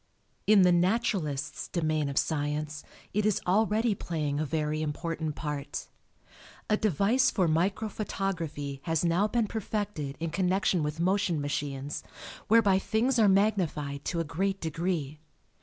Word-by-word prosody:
In 205 -2 +7
the 180 - +6
naturalist's 175 - 0
domain 155 -4 0
of 140 - -5
science 150 0 -1 0.3
it 210 - +1
is 210 -2 +2
already 215 +4 +2
playing 150 -6 -2
a 155 - 0
very 155 0 -1
important 155 0 -3
part. 150 -3 -4 0.8
A - - +6
device 215 - +3
for 185 -4 +1
micro 185 +7 +1
photography 165 -9 -3
has 165 0 +1
now 175 +5 +3
been 235 +1 +1
perfected 205 -9 -3
in 165 0 -3
connection 185 0 +1
with 150 +1 -3
motion 185 -2 +1
machines 145 0 -3 0.5
whereby 205 -4 +5
things 235 +5 +1
are 210 -2 +6
magnified 175 -8 +1
to 170 - -1
a - - +1
great 195 +6 -1
degree. 160 -2 -2
170 Hz, 140 wpm, -29 LUFS, 150-200 Hz, 0.8 s, In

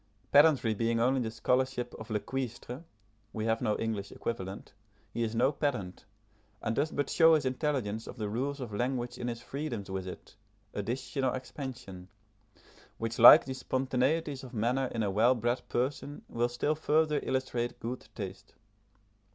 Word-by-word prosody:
Pedantry 145 -6 +6
being 115 +2 0
only 130 +3 +3
the 115 - -2
scholarship 125 +2 0
of 110 +1 -9
le 110 -1 0
cuistre 125 +3 -5 0.5
(we 110 -1 -3
have 115 0 +1
no 110 -4 +1
English 110 -3 -3
equivalent) 95 -4 -5 0.4
he 120 - -2
is 115 0 -1
no 125 +4 +3
pedant, 125 -12 -3 0.5
and 110 - -2
does 145 +4 +1
but 145 - -1
show 165 -1 +6
his 150 -3 0
intelligence 130 -5 -1
of - - -8
the 110 -2 -2
rules 135 +7 -2
of 120 -5 -6
language 120 +2 -2
in 120 - -3
his 120 -1 -4
freedoms 120 -9 -4
with 95 -1 -3
it, 90 - -9 0.4
addition 125 +6 -3
or 130 - +2
expansion, 125 -8 -7 0.9
which 115 0 -3
like 120 - +11
the 130 - -4
spontaneities 130 +3 0
of 125 -2 -9
manner 125 +4 +1
in 115 -2 -2
a 100 - 0
well 115 +6 +4
bred 120 +2 0
person 140 +3 -2
will 120 +1 0
still 120 +5 0
further 155 0 +2
illustrate 125 -2 -2
good 125 +2 -5
taste. 100 -1 -7
120 Hz, 165 wpm, -31 LUFS, 110-135 Hz, 0.9 s, like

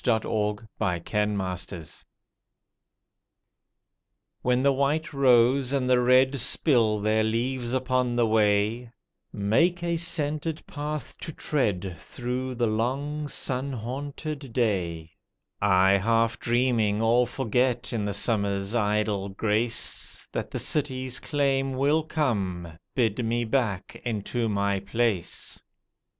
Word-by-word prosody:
THE 125 - +3
SAD 110 - 0
TEARS - - -5
OCTOBER, 105 0 -1
1915 95 -3 -2 2.4
WHEN 125 +1 +1
the 140 - +5
white 145 +4 0
rose 130 0 +4
and 135 -2 0
the 125 -1 +4
red 130 +2 +4
spill 115 -4 +3
their 110 +1 +2
leaves 120 +2 -1
upon 130 -1 0
the 120 -1 +3
way, 110 +2 +2 0.4
Make 165 - +1
a 170 -1 0
scented 155 -1 -1
path 150 -3 -5
to - - -6
tread 100 - -1
through 125 +4 -4
the 120 0 +1
long, 135 +7 -1
sun 135 -1 -1
haunted 140 +3 -5
day; 85 -9 -1 0.5
I 95 0 +4
half 115 +2 +1
dreaming 115 -3 +1
all 120 +2 +3
forget 125 0 0
in 110 -3 -1
the 100 -2 -2
summer's 100 -2 0
idle 105 -3 0
grace, 110 +4 -1
That - - -3
the - - -4
city's 130 -4 0
claim 135 -2 0
will 140 +4 +2
come, 95 - -2 0.2
bid 115 -2 +1
me 120 +1 0
back 110 -5 -2
into 115 0 -2
my 100 -1 0
place. 100 -2 -2
120 Hz, 120 wpm, -26 LUFS, 105-135 Hz, 2.4 s, the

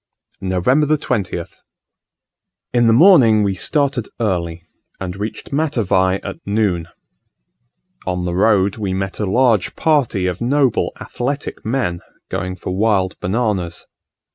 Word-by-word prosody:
November 95 +11 +2
20th. 95 - -3 1.2
In 120 -1 +4
the - - +5
morning 120 - +6
we 100 -1 +1
started 140 +2 0
early, 85 -6 -2 0.4
and 90 -1 -5
reached 105 +6 -6
Matavai 105 - +1
at 100 - -6
noon. 100 -5 0 1.2
On 90 -1 -1
the 90 - -2
road 100 +1 +2
we 100 -4 -2
met 95 0 -3
a 105 - -1
large 115 -1 +2
party 140 - +1
of 90 +2 -2
noble 130 0 +2
athletic 140 +4 -4
men, 110 -7 -1 0.3
going 90 0 -3
for 90 -1 -5
wild 100 -2 +1
bananas. 95 -4 -2
100 Hz, 120 wpm, -19 LUFS, 95-120 Hz, 1.2 s, morning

